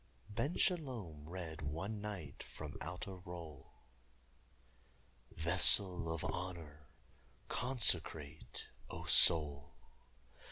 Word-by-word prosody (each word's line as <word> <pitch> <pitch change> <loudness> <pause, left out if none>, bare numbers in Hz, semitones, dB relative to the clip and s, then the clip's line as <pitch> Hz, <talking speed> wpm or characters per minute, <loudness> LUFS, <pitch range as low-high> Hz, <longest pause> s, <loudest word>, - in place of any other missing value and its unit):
Ben 120 - -2
Shalom 115 - -2
read 85 -4 -6
one 95 +9 -4
night 95 -9 -6
from - - -9
out 90 +5 -5
a 100 - -7
roll: 85 -6 -10 1.6
"Vessel 90 +1 +3
of 80 - -3
honor, 80 -5 -5 0.6
consecrate 80 - 0 0.2
('O - - -7
soul!') 75 -3 +5
85 Hz, 85 wpm, -36 LUFS, 75-100 Hz, 1.6 s, soul